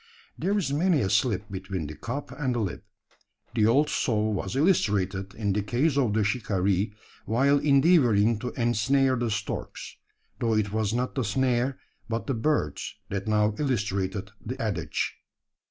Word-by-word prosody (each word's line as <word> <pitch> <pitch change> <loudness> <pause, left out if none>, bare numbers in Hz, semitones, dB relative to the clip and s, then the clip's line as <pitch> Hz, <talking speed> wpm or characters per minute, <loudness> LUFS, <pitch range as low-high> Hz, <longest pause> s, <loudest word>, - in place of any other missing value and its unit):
There 200 +3 0
is 160 -9 -1
many 165 0 +2
a 95 - 0
slip 105 -1 +1
between 95 -3 -4
the 75 - -6
cup 125 - -5
and 130 -2 -2
the - - 0
lip. 100 -5 -3 0.7
The 110 -2 +3
old 140 +6 +4
saw 110 -6 0
was 95 -1 -3
illustrated 100 - +1
in 105 -3 -1
the 105 - 0
case 125 +8 +1
of 125 -7 +2
the 110 - +3
shikaree 100 -2 0 0.3
while 140 +6 +3
endeavouring 135 - +4
to 125 - -3
ensnare 130 +3 +2
the 120 -1 -1
storks; 105 -1 -5 0.4
though 115 -2 +1
it 105 -2 0
was 110 -1 0
not 125 +2 -1
the 130 - -1
snare, 125 +4 +1 0.3
but 115 0 -2
the 135 - -1
birds 115 - -1
that 100 +1 -3
now 105 0 +2
illustrated 100 -7 -1
the 130 +4 -5
adage. 95 -9 -2
110 Hz, 160 wpm, -27 LUFS, 100-130 Hz, 0.7 s, old